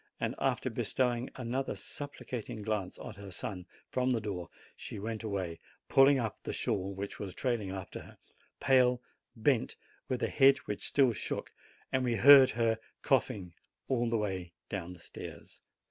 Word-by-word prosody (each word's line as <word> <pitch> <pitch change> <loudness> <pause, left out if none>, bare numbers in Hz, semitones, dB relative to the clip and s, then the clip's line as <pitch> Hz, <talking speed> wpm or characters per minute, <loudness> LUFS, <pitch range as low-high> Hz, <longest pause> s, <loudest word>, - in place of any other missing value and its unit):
And - - -1
after - - 0
bestowing 125 -1 0
another 130 +2 -2
supplicating 125 -6 -6
glance 105 -3 -2
at - - -8
her 100 -1 -8
son 90 0 -5 0.2
from 125 0 +1
the 125 -3 +2
door, 95 -5 -4 0.3
she - - -7
went 110 +2 -4
away, 95 -6 -3 0.3
pulling 135 +1 +7
up 115 -5 -2
the - - -4
shawl 95 0 -1
which 100 +1 -5
was 95 -3 -5
trailing 120 -6 -1
after 95 -1 -6
her, - - -13 0.4
pale, 125 -2 +4 0.4
bent, 120 +2 +2 0.3
with 130 - -1
a - - +3
head 135 0 +6
which 105 - -3
still 135 -4 +4
shook, - - -4 0.4
and 130 0 +2
we 120 -2 +1
heard 135 +1 +9
her 115 -1 +1 0.2
coughing 115 - +1 0.3
all 120 -2 +1
the 115 - +2
way 95 -5 -3 0.2
down 90 -3 -4
the 90 - -14
stairs. - - -10
115 Hz, 160 wpm, -32 LUFS, 100-130 Hz, 0.4 s, heard